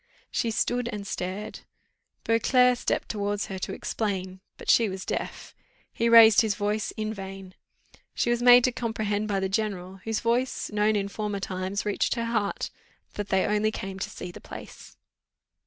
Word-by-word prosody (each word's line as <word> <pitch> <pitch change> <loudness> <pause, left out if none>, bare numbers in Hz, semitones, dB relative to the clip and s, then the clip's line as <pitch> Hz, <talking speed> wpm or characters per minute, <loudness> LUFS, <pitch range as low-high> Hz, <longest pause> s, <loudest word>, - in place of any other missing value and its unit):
She 230 - 0
stood 240 +2 0
and 205 -3 -5
stared. 195 +3 -4 0.6
Beauclerc 250 +2 +4
stepped - - -1
towards 205 -1 -2
her 190 -1 -6
to - - -4
explain; 190 -3 -3 0.2
but - - -11
she 230 -3 +5
was 190 0 -6
deaf: - - -4 0.4
he 230 0 +1
raised 225 -2 +9
his 215 -3 0
voice 210 +2 -1
in 215 0 -2
vain. 195 -2 -8 0.6
She 240 - +1
was 240 0 0
made 245 0 +8
to 255 - +3
comprehend 215 -3 -2
by 200 -2 0
the 190 - 0
general, 195 -2 -2
whose 220 +3 -3
voice, 240 +3 0
known 210 +1 +2
in 200 -1 0
former 210 0 -3
times, 190 +1 -3
reached 205 +2 0
her 235 -1 -2
heart 220 -3 -1 0.4
"that 205 -1 -5
they 190 -1 +2
only 210 +1 +2
came 195 -3 -6
to - - -3
see 180 - -7
the - - -12
place." - - -11
210 Hz, 170 wpm, -27 LUFS, 195-230 Hz, 0.6 s, raised